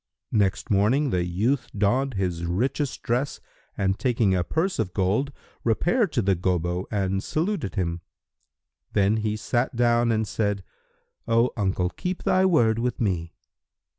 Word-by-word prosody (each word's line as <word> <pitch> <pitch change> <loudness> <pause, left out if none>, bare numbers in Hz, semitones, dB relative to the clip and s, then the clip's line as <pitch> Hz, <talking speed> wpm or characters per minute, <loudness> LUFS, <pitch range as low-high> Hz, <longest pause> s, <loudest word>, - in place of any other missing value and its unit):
Next 100 -2 +1
morning, 120 +8 +3
the 90 -1 +1
youth 105 +10 0
donned 125 +5 +1
his 90 -3 -1
richest 130 - -1
dress 125 +4 -1 0.4
and 95 0 0
taking 115 -5 +2
a 90 -1 +1
purse 180 - -1
of 90 - -2
gold, 105 +9 +1 0.3
repaired 175 - +2
to 120 - +1
the 100 0 +3
Gobbo 90 0 -1
and 95 -2 -1
saluted 165 - -2
him. 85 -2 -1 0.9
Then 100 +1 +3
he 110 0 -1
sat 120 +4 -1
down 120 0 +3
and 110 -1 0
said, 100 -2 -1 0.6
"O 115 +2 +3
uncle, 95 -3 0
keep 180 0 -4
thy 185 +1 +3
word 115 -11 +3
with 125 0 -1
me." 85 -6 -1
110 Hz, 145 wpm, -25 LUFS, 95-125 Hz, 0.9 s, morning